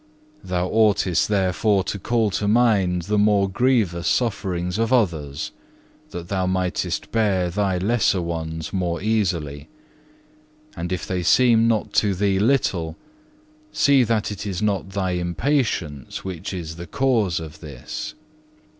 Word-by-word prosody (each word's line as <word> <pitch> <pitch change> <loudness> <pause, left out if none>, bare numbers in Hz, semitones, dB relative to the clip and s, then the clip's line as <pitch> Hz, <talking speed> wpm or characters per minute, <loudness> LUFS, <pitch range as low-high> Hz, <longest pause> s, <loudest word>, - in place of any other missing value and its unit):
Thou 90 -1 -1
oughtest 105 -4 +2
therefore 100 0 +1
to 100 - -4
call 115 +1 +1
to 100 +2 -1
mind 100 -6 +3
the 105 +4 0
more 105 -1 +3
grievous 100 -5 +1
sufferings 95 -5 -1
of 115 +1 0
others 80 - 0 0.6
that 85 -1 -7
thou 95 -1 -1
mightest 95 -1 -2
bear 95 -6 +1
thy 95 0 0
lesser 105 0 +2
ones 80 -2 -4
more 90 -3 -1
easily, 85 -9 -1 1.1
and 85 +1 -4
if 90 - -2
they 90 -1 -2
seem 115 +4 +4
not 110 -2 0
to 100 -2 +2
thee 100 0 +1
little, 100 -9 +1 0.7
see 140 -2 +4
that 110 -2 0
it 105 0 -5
is 95 -3 -3
not 100 -2 -1
thy 95 -1 -2
impatience 90 - -1
which 95 0 -5
is 85 -3 -6
the 85 0 -8
cause 110 -11 +1
of 80 -1 -9
this. 70 -7 -7
95 Hz, 135 wpm, -22 LUFS, 85-110 Hz, 1.1 s, seem